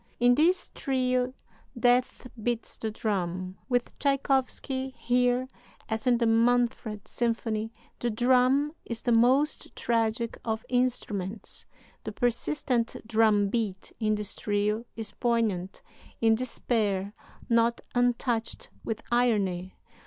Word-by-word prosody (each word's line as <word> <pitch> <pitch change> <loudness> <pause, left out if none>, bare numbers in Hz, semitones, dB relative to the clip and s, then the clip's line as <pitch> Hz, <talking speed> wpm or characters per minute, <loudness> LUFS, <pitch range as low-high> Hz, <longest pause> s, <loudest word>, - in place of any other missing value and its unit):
In 245 0 +6
this 345 +7 +2
trio 255 -1 0 0.5
Death 245 +1 +2 0.2
beats 235 +1 -2
the 220 - -2
drum. 185 -4 -3
With 245 -1 0
Tschaikowsky, 270 -1 0
here, 245 +1 +2 0.4
as 220 +1 -2
in 245 -1 +5
the 235 - +1
'Manfred' 230 -2 +2
symphony, 225 -2 -1 0.3
the 240 - 0
drum 255 +5 +3
is 235 -1 -5
the 240 - +1
most 255 +6 +3
tragic 230 0 0
of 220 -1 -2
instruments. 220 -6 -1 0.4
The - - -4
persistent 245 0 0
drum 215 -2 +3
beat 205 -4 -2
in 215 -2 +2
this 210 -1 -3
trio 210 +2 0
is 225 -1 -5
poignant 220 -6 -1 0.4
in 225 -1 +4
despair 215 -4 -1 0.3
not 235 0 +2
untouched 245 -1 0
with 225 -1 -4
irony. 200 -7 +1
235 Hz, 115 wpm, -28 LUFS, 215-250 Hz, 0.5 s, In